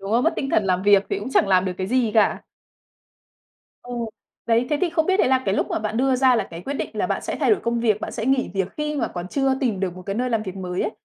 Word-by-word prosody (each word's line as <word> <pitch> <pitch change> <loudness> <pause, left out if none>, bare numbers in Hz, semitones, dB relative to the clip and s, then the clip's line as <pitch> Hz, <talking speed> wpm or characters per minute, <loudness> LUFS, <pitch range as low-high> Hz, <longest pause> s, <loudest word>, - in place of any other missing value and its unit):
đúng 195 +1 -6
không? 240 +5 +2
Mất 330 - +3
tinh 270 - -2
thần 215 - +2
làm 185 -1 +1
việc 200 -1 +5
thì - - 0
cũng 215 +6 -6
chẳng 205 - +3
làm 185 -1 +4
được 185 - -1
cái 185 - -2
gì 245 0 +1
cả. 215 - +3 1.4
Ờ. 245 - -10 0.5
Đấy, 230 +1 +2
thế 295 - +1
thì 365 - +2
không 320 -1 +1
biết 380 +2 +2
đấy - - +3
là 260 0 +3
cái 195 - +1
lúc - - 0
mà - - -1
bạn 215 +1 -3
đưa 265 +1 +2
ra 255 -1 +4
là 225 - +1
cái 165 - -7
quyết 275 - -4
định - - -3
là - - -1
bạn - - -1
sẽ - - -4
thay - - +2
đổi 415 - +3
công 235 0 -1
việc, 215 -3 +1
bạn - - -4
sẽ 225 - -4
nghỉ 265 0 +1
việc 190 -2 0
khi 300 0 -2
mà 280 - 0
còn 175 0 -6
chưa 270 +5 +1
tìm 230 -8 0
được 185 -2 -2
một 185 - -9
cái 195 +2 -4
nơi 250 +3 -1
làm 225 -2 0
việc 190 -3 -6
mới 180 -1 -3
ấy, - - -1
225 Hz, 310 wpm, -23 LUFS, 195-265 Hz, 1.4 s, việc